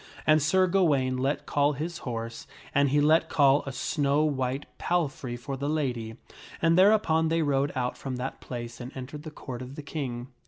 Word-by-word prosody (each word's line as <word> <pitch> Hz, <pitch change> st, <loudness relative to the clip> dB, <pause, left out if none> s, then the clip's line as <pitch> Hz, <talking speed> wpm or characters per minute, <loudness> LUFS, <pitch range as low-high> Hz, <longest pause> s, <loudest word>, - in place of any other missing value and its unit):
And 155 Hz, 0 st, +5 dB
Sir 185 Hz, +6 st, +4 dB
Gawaine 145 Hz, -9 st, +2 dB
let 135 Hz, +3 st, -1 dB
call 145 Hz, 0 st, +2 dB
his 165 Hz, +5 st, -4 dB
horse, 115 Hz, -1 st, -5 dB, 0.3 s
and 140 Hz, -1 st, +3 dB
he 145 Hz, +2 st, +3 dB
let 160 Hz, +2 st, +4 dB
call 140 Hz, -1 st, +4 dB
a -, -, -2 dB
snow 145 Hz, +2 st, +1 dB
white 135 Hz, -2 st, -1 dB
palfrey 140 Hz, -8 st, -1 dB
for 135 Hz, +3 st, -5 dB
the 140 Hz, +2 st, -3 dB
lady, 125 Hz, -7 st, -2 dB, 0.4 s
and 165 Hz, 0 st, +3 dB
thereupon 185 Hz, -4 st, +4 dB
they 165 Hz, 0 st, +1 dB
rode 140 Hz, -1 st, +1 dB
out 125 Hz, -1 st, -1 dB
from 135 Hz, -2 st, -4 dB
that 125 Hz, +2 st, -5 dB
place 120 Hz, 0 st, -7 dB
and 125 Hz, +2 st, -7 dB
entered 140 Hz, +3 st, -7 dB
the 155 Hz, -, -7 dB
Court 130 Hz, -5 st, -8 dB
of 130 Hz, +2 st, -8 dB
the 150 Hz, -, -7 dB
King. 130 Hz, -5 st, -5 dB
140 Hz, 190 wpm, -27 LUFS, 130-155 Hz, 0.4 s, And